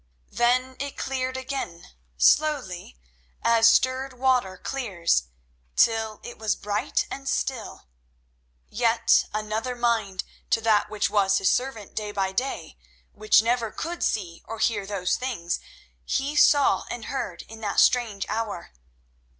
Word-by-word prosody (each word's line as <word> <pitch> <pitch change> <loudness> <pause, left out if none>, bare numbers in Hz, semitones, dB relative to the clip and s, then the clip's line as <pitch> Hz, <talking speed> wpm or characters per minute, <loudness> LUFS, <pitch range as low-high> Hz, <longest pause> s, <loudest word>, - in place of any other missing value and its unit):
Then 255 +2 +1
it 280 +1 -5
cleared 260 -1 -2
again, 260 -10 -5 0.3
slowly, 190 - +2 0.5
as 230 -1 +5
stirred 260 +2 +2
water 250 -7 +1
clears, 185 - 0 0.5
till 220 -2 +2
it 240 - -9
was 220 -2 0
bright 205 0 -1
and 275 0 -5
still; 250 -6 -3 0.8
yet 230 0 +3
another 215 +4 -3
mind 230 -6 0 0.3
to - - +3
that 215 -2 +3
which 210 -1 -1
was 195 -2 +3
his 190 - +3
servant 245 -6 -2
day 210 -1 -3
by 195 -2 -1
day 255 +8 -3 0.3
which 215 +1 +4
never 235 -1 +1
could 340 +1 -5
see 175 -6 -2
or 225 - -6
hear 210 -3 0
those 195 -3 -1
things 230 -10 -3 0.4
he 280 - -1
saw 290 -1 +4
and 235 -3 -5
heard 270 -2 -4
in 225 0 -12
that 205 -2 0
strange 225 -6 +3
hour. 220 - -4
225 Hz, 135 wpm, -25 LUFS, 205-255 Hz, 0.8 s, as